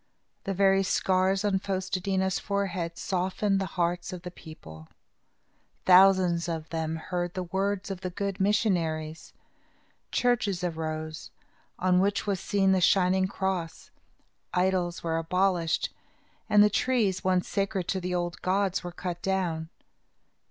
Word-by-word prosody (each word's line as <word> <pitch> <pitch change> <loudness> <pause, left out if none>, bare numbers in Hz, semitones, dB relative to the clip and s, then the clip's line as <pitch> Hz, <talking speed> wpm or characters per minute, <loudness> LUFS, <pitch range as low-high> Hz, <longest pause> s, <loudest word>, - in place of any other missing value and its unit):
The 195 - -2
very 195 0 +4
scars 190 +1 +1
on 195 -2 +2
Fos 190 -1 -3
te 185 -1 -2
dí 195 0 -1
na's 190 0 +1
forehead 190 -4 -2
softened 195 +2 0
the 190 - -2
hearts 175 +1 0
of 180 -1 -7
the 180 - -6
people. 80 - -12 1.0
Thousands 185 -2 +5
of 160 -1 -4
them 160 -1 -2
heard 175 +2 -4
the 185 - -2
words 195 +2 -2
of 190 -1 -6
the 185 - -3
good 195 +1 -4
missionaries. 165 -6 0 0.8
Churches 215 -7 +1
arose, 155 -2 -4 0.5
on 180 0 +3
which 200 +2 +1
was 200 -3 -1
seen 195 0 +2
the 190 -1 +3
shining 185 +1 +3
cross. 190 -4 -3 0.6
Idols 180 -1 0
were 165 -1 0
abolished 175 0 0 0.6
and 210 0 +7
the 210 - +4
trees, 210 -7 +1
once 185 -1 +1
sacred 195 -2 -1
to 190 - -1
the 180 0 -2
old 175 -1 -3
gods, 190 0 0
were 175 - -5
cut 175 0 -5
down. 175 -4 -1
185 Hz, 145 wpm, -28 LUFS, 175-195 Hz, 1.0 s, and